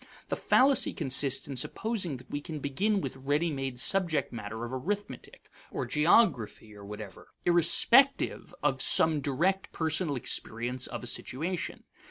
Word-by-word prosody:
The - - 0
fallacy 270 0 +3
consists 135 0 0
in 135 -2 -6
supposing 185 - -2
that 125 - -16
we 145 - -3
can 155 +1 -7
begin 195 +9 0
with - - -5
ready 145 +5 0
made 135 -2 -4
subject 170 -4 +1
matter 110 0 -6
of 120 +2 -6
arithmetic, 200 +11 -5 0.2
or - - -4
geography, 150 - +2
or 100 - -12
whatever, 105 -1 -9 0.2
irrespective 235 - +4
of - - +1
some 155 -2 +4
direct 170 +8 -1
personal 160 -1 -1
experience 120 +1 -2
of - - -7
a - - -6
situation. 160 +8 -3
145 Hz, 145 wpm, -29 LUFS, 125-180 Hz, 0.2 s, irrespective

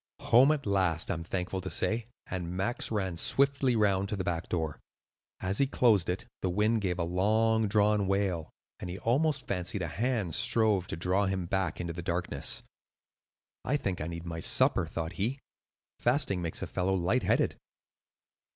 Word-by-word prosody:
"Home 130 +5 +5
at 150 -3 -1
last, 95 -4 +1
I - - +1
am 85 -1 -5
thankful 90 +2 -3
to - - -5
say;" 110 +1 -1 0.2
and 90 -1 -4
Max 100 +6 -1
ran 95 -6 -2
swiftly 140 +4 +2
round 100 -3 +2
to - - -2
the 95 - -3
back 85 -2 -3
door. 80 -4 -2 0.6
As 95 +2 -1
he 140 - +3
closed 110 -9 +3
it, 90 +5 -2 0.2
the 95 - 0
wind 105 +4 +1
gave 90 -2 -1
a 85 - 0
long 110 +5 +2
drawn 105 -1 +2
wail, 95 -5 0 0.3
and 90 - -6
he 90 - -5
almost 140 +8 +1
fancied 90 0 -2
a - - -2
hand 105 -1 -1
strove 105 -3 +2
to - - -4
draw 95 +3 +1
him 95 -2 -2
back 95 -2 -1
into 85 -1 -3
the 85 - -6
darkness. 85 +1 0 1.0
"I 145 - +1
think 95 - -3
I 75 - -3
need 85 0 -6
my 85 -1 -5
supper," - - +3
thought 80 0 -4
he. 120 +7 0 0.6
"Fasting 120 -7 +2
makes 85 -2 -2
a - - -1
fellow 95 +1 0
light 95 +8 +1
headed." - - +1
95 Hz, 180 wpm, -30 LUFS, 90-110 Hz, 1.0 s, Home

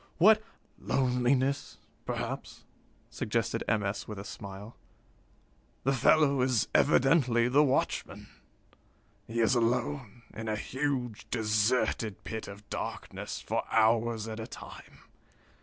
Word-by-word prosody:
What 215 +5 +6 0.2
" - - -33
"Loneliness, 130 +2 +1 0.3
perhaps," - - -4 0.5
suggested - - -1
M. 105 -1 +1
S. 100 +1 -3
with 105 - -6
a 100 - -6
smile. 100 +2 -9 1.1
"The 135 - +2
fellow 140 +1 +4
is 125 -3 +2
evidently 125 -4 +4
the 135 +4 +4
watchman. 135 -2 -1 1.0
He 115 +1 -1
is 115 - +4
alone, 120 0 -1
in 110 +1 -6
a 110 - 0
huge, 130 -1 -3
deserted 110 -1 0
pit 110 -1 -5
of 100 +1 -11
darkness, - - -5
for - - -1
hours 115 0 +2
at 110 0 -5
a 110 - -5
time. - - -11
115 Hz, 120 wpm, -30 LUFS, 110-130 Hz, 1.1 s, What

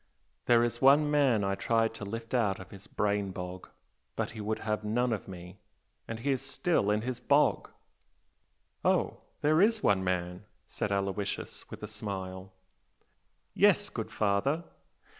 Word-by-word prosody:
There 120 -1 +6
is 120 0 -2
one 145 +2 +6
man 135 -8 +3
I 100 0 +1
tried 115 +2 +1
to 115 - -8
lift 115 +3 -6
out 105 -6 +1
of 95 - -11
his 100 0 -12
brain 100 -1 0
bog, 90 -1 -7 0.5
but - - -2
he 110 - -7
would 110 +1 -1
have 105 -1 -2
none 120 +3 +1
of 110 - -5
me, 90 0 -10 0.5
and 115 0 -5
he 140 +3 +1
is 130 - 0
still 135 - 0
in 105 +1 +1
his 125 0 -3
bog!" - - +2 1.1
"Oh! - - +2 0.2
There 155 +3 +4
is 220 +1 +3
one 95 -2 +3
man!" 90 +1 -2 0.2
said 105 - -3
Aloysius, 100 0 -3
with - - -9
a - - -3
smile. 95 -3 -6 1.0
"Yes, - - +4
good - - -5
father!" 110 +11 +1
105 Hz, 160 wpm, -30 LUFS, 100-120 Hz, 1.1 s, There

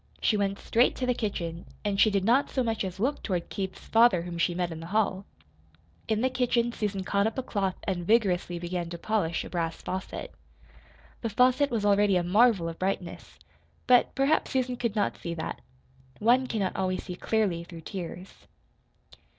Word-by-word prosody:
She 220 - +2
went 200 -1 0
straight 240 +3 +2
to 255 - -2
the 250 - +2
kitchen, 175 -7 -4 0.2
and 200 -1 0
she 220 - +6
did 195 -2 0
not 250 +6 +3
so 260 - 0
much 225 -2 -1
as 190 0 -5
look 270 +7 0
toward 180 -4 -2
Keith's 190 -1 -5
father 225 -7 +4
whom 170 -1 -6
she 175 0 +1
met 175 -1 -1
in 160 - -6
the 165 - -8
hall. 200 -1 0 0.8
In 220 0 +1
the 260 - +2
kitchen 245 -2 +1
Susan 205 -4 -3
caught 200 +2 +1
up 220 - -4
a 260 - -1
cloth 195 -5 -1
and 180 -3 -2
vigorously 190 -6 +2
began 175 0 -3
to 170 - -6
polish 180 -3 -1
a - - -8
brass 165 -2 -2
faucet. 185 0 -5 0.9
The 230 - -2
faucet 255 +6 +3
was 225 -4 -1
already 205 -1 +4
a 180 - +2
marvel 200 -1 +4
of 165 0 -6
brightness; 185 -2 -4 0.5
but 250 -1 +4
perhaps 275 +4 +2
Susan 255 -1 0
could 235 -3 -2
not 205 - 0
see 170 0 -4
that. 160 - -5 0.6
One 245 +4 +3
cannot 205 -6 -1
always 185 -1 -1
see 180 - -6
clearly 190 -4 0
through 170 -1 -10
tears. 180 +1 -8
200 Hz, 190 wpm, -28 LUFS, 180-230 Hz, 0.9 s, she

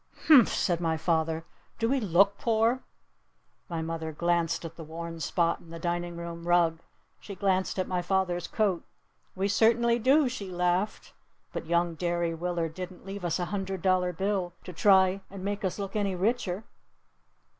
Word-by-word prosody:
"Humph!" 280 -8 +8
said 175 -2 0
my 165 -1 0
father. 160 0 0 0.3
"Do 225 - +1
we 270 +3 +2
look 200 -1 +3
poor?" 230 +2 +2 0.9
My 165 -2 -2
mother 160 -1 -4
glanced 170 +1 0
at 165 0 -7
the 165 - -8
worn 165 +1 -7
spot 170 +2 +1
in 165 - -17
the 165 - -7
dining 175 0 -3
room 170 0 -7
rug. 170 -2 +3 0.4
She 200 - -9
glanced 190 0 0
at 185 - 0
my 180 -1 -1
father's 180 -1 0
coat. 200 -6 0 0.5
"We 195 +1 0
certainly 235 +3 +3
do!" 270 +5 +4
she 215 -6 -5
laughed. 180 +3 -1 0.4
"But - - -5
young 170 0 +1
Derry 170 0 -1
Willard 170 -1 -2
didn't 185 +1 -8
leave 195 0 -6
us 170 -2 0
a 180 - -1
hundred 195 -2 -3
dollar 185 -1 +2
bill 190 0 -1
to 180 - -8
try 190 +1 +4
and 195 -1 -8
make 205 +1 -2
us 190 - -1
look 200 -1 -5
any 200 -3 0
richer. 200 0 -1
180 Hz, 170 wpm, -28 LUFS, 170-200 Hz, 0.9 s, Humph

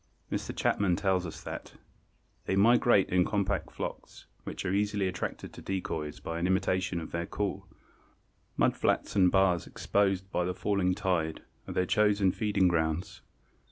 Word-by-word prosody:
Mr. - - -2
Chapman 95 -4 +2
tells 95 -1 +1
us 80 - -9
that - - -7 0.7
"they 95 - 0
migrate 115 0 +5
in 90 0 +4
compact 100 0 -1
flocks, - - -7 0.2
which - - -5
are 95 - 0
easily 100 -1 +1
attracted 90 -1 -4
to - - -10
decoys 80 -6 -4
by 80 0 -4
an 85 - +1
imitation 95 -1 +1
of 80 - -7
their 85 0 -3
call. 100 -2 -3 0.9
Mud - - +3
flats - - 0
and 90 -3 +5
bars 95 -3 +3
exposed 95 -1 0
by 90 - +1
the 90 +1 -2
falling 95 -2 +1
tide 90 -6 -1 0.2
are - - -5
their 90 - +2
chosen 100 -1 +3
feeding 105 -2 +1
grounds. 80 0 -1
95 Hz, 155 wpm, -30 LUFS, 90-100 Hz, 0.9 s, migrate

